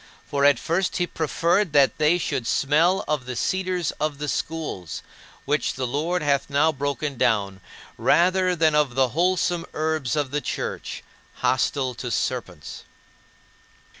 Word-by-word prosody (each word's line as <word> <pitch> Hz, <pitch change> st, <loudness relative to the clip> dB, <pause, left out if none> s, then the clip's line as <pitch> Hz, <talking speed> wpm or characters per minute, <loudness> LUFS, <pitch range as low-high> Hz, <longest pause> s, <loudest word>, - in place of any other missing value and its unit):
For 140 Hz, 0 st, 0 dB
at 145 Hz, 0 st, +6 dB
first 175 Hz, +3 st, -1 dB
he 180 Hz, -, +1 dB
preferred 170 Hz, +2 st, 0 dB
that 140 Hz, 0 st, +4 dB
they 155 Hz, +3 st, +4 dB
should 130 Hz, -8 st, -2 dB
smell 165 Hz, +7 st, +2 dB
of 145 Hz, -5 st, -2 dB
the 125 Hz, -, -4 dB
cedars 185 Hz, +1 st, -1 dB
of 150 Hz, -2 st, -1 dB
the 150 Hz, +1 st, -4 dB
schools 145 Hz, -, -4 dB, 0.4 s
which -, -, 0 dB
the 130 Hz, -, -2 dB
Lord 155 Hz, +7 st, -1 dB
hath 140 Hz, -1 st, +1 dB
now 145 Hz, +3 st, +3 dB
broken 145 Hz, 0 st, -3 dB
down, 100 Hz, -5 st, +1 dB, 0.4 s
rather 185 Hz, +1 st, +3 dB
than 160 Hz, -2 st, +3 dB
of 150 Hz, -5 st, +2 dB
the 130 Hz, -1 st, +3 dB
wholesome 175 Hz, +3 st, +1 dB
herbs 155 Hz, -4 st, -1 dB
of 145 Hz, -3 st, -1 dB
the 150 Hz, +1 st, -1 dB
Church, -, -, -4 dB, 0.3 s
hostile 130 Hz, +1 st, 0 dB
to 125 Hz, +1 st, -6 dB
serpents. 110 Hz, -, -3 dB
150 Hz, 145 wpm, -24 LUFS, 135-170 Hz, 0.4 s, at